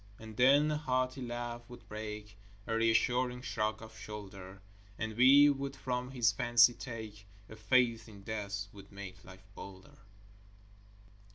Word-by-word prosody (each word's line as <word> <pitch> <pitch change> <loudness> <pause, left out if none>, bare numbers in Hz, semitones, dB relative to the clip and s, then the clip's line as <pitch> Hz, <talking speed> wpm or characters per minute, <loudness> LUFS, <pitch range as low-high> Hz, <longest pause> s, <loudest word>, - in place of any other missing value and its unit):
And 110 -1 -11
then 140 +5 +5
a 150 - 0
hearty 130 -2 -1
laugh 120 -1 -4
would 120 - -13
break, 105 -1 -7 0.3
A 115 - -2
reassuring 125 +2 +1
shrug 110 -3 -2
of 110 0 -12
shoulder; 100 -3 -9 0.4
And 110 -1 -4
we 135 +4 +7
would 140 -1 -1
from 125 -1 -3
his 120 -3 +2
fancy 120 +1 +5
take 110 -4 -8 0.2
A 110 - -11
faith 115 0 +2
in 100 -2 -13
death 100 -2 -4
which 100 -1 -13
made 95 -2 -10
life 95 0 -14
bolder. 95 0 -12
115 Hz, 145 wpm, -33 LUFS, 105-125 Hz, 0.4 s, we